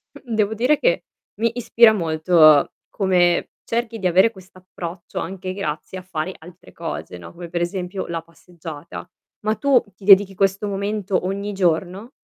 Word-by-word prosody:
Mh, 265 -5 -8
devo 215 -1 +1
dire 250 +7 +2
che - - +1 0.4
mi 230 0 +2
ispira 230 -1 +5
molto 160 -4 +4 0.2
come 180 -3 +2
cerchi 230 -1 -3
di 190 - +1
avere 190 +6 +4
quest'approccio 185 -2 -9
anche 185 +1 -5
grazie 185 -1 -5
a - - -10
fare 185 0 -4
altre 175 +2 -15
cose, 165 - -6
no, 85 - -11
come 170 0 -9
per 170 0 -2
esempio 180 +2 -3
la 170 -1 -3
passeggiata. 165 -1 -10 0.3
Ma 215 +1 0
tu 255 +2 +3
ti 195 - -19
dedichi 195 -1 +6
questo 195 +2 +1
momento 200 -1 -2
ogni 200 +2 -3
giorno? 185 +4 -1
185 Hz, 155 wpm, -21 LUFS, 175-210 Hz, 0.4 s, dedichi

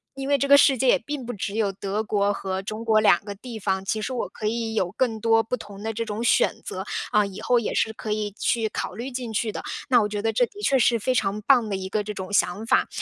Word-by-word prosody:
因 270 0 -5
为 285 0 +3
这 280 +1 -1
个 280 - +9
世 275 -2 +5
界 255 +2 +2
也 - - +5
并 285 +1 -5
不 245 - -4
只 200 -1 -4
有 215 -3 +1
德 200 +2 -3
国 205 -1 +1
和 190 -1 -3
中 215 +3 -6
国 220 -1 +4
两 205 -3 +4
个 205 -1 -6
地 230 +3 -9
方， 190 0 -1
其 215 +2 -1
实 260 - -3
我 250 - -2
可 215 - -8
以 225 0 -1
有 185 -5 0
更 225 -1 -1
多 225 0 +4
不 225 +3 -2
同 205 -4 -11
的 225 +1 -3
这 230 +1 -2
种 215 0 -4
选 - - +2
择， - - -4 0.3
啊， 210 -1 +4
以 195 -1 -8
后 245 -1 +2
也 230 - -3
是 220 - +1
可 215 -1 -6
以 210 -1 -1
去 230 -2 +1
考 215 - -4
虑 240 +4 -5
进 245 -3 -5
去 215 0 -1
的， - - -5 0.2
那 250 -3 +5
我 210 - -1
觉 205 0 -3
得 225 0 0
这 245 +3 +3
的 415 - -12
确 275 - +3
是 235 -1 +3
非 255 +4 0
常 205 -2 0
棒 235 -3 +4
的 195 - -1
一 190 0 -5
个 210 +2 -1
这 210 +1 -5
种 190 0 -7
想 205 +2 +1
法。 - - +3
220 Hz, 305 characters per minute, -24 LUFS, 205-240 Hz, 0.3 s, 个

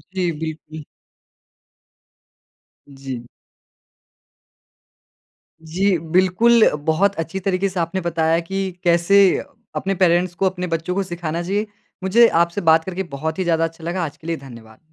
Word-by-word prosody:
जी, 180 -2 0
बिल्कुल। 155 -1 -7 2.0
जी। 135 -3 -8 2.4
जी, 185 +3 +1
बिल्कुल। 185 +8 +4 0.2
बहुत 195 +5 +2
अच्छी 165 +4 -3
तरीके 190 +1 0
से 185 - -4
आपने 170 +3 -2
बताया 165 -1 +1
कि 190 +2 -3
कैसे 175 +3 +3 0.6
अपने 195 0 -1
पेरेंट्स 175 0 +2
को 195 - 0
अपने 180 0 -5
बच्चों 165 +2 -2
को 195 - 0
सिखाना 175 -2 -4
चाहिए। 205 +4 -1 0.4
मुझे 230 +5 +5 0.2
आपसे 170 +4 -4
बात 160 0 +4
करके 190 +1 -4
बहुत 160 +4 -3
ही 185 - +1
ज़्यादा 165 -1 +1
अच्छा 165 0 -5
लगा। 175 +2 -2
आज 145 0 -8
के 160 - -13
लिए 165 -1 -1
धन्यवाद। 115 -5 -13
175 Hz, 135 wpm, -20 LUFS, 160-190 Hz, 2.4 s, मुझे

